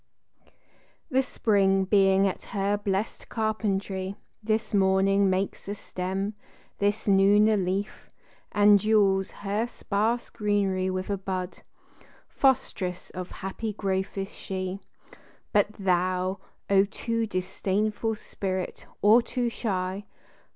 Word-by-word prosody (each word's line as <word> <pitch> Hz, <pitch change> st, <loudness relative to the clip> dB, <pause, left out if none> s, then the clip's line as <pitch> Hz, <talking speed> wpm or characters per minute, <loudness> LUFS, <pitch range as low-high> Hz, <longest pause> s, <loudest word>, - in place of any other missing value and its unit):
THE 265 Hz, 0 st, +4 dB
spring 195 Hz, -6 st, +2 dB
being 195 Hz, 0 st, +4 dB
at 190 Hz, -, -3 dB, 0.2 s
her 200 Hz, +1 st, +2 dB
blessed 205 Hz, 0 st, -3 dB
carpentry, 200 Hz, -3 st, -2 dB, 0.3 s
This 215 Hz, +1 st, -1 dB
morning 195 Hz, 0 st, +3 dB
makes 190 Hz, +1 st, -2 dB
a 205 Hz, -, -3 dB
stem, 190 Hz, +2 st, -3 dB, 0.5 s
this 205 Hz, +2 st, 0 dB
noon 200 Hz, +2 st, +5 dB
a 220 Hz, -, +4 dB
leaf, 195 Hz, +1 st, -2 dB, 0.4 s
And 205 Hz, 0 st, +6 dB
jewels 200 Hz, -2 st, +3 dB
her 205 Hz, +3 st, -2 dB
sparse 225 Hz, +1 st, -1 dB
greenery 200 Hz, -3 st, 0 dB
with 185 Hz, +1 st, -3 dB
a 200 Hz, -, -1 dB
bud; 185 Hz, -1 st, -4 dB, 0.7 s
Fostress 225 Hz, -, 0 dB
of 185 Hz, 0 st, -6 dB
happy 210 Hz, +3 st, -5 dB
growth 190 Hz, -1 st, -2 dB
is 195 Hz, 0 st, -4 dB
she. 185 Hz, 0 st, -4 dB, 0.7 s
But 205 Hz, -1 st, +4 dB
thou, 185 Hz, 0 st, 0 dB, 0.3 s
O 195 Hz, 0 st, +5 dB
too 230 Hz, +2 st, -2 dB
disdainful 205 Hz, +3 st, -1 dB
spirit, 190 Hz, -3 st, -4 dB, 0.2 s
or 215 Hz, +4 st, +7 dB
too 245 Hz, 0 st, -2 dB
shy! 195 Hz, -3 st, -3 dB
195 Hz, 115 wpm, -27 LUFS, 190-210 Hz, 0.7 s, or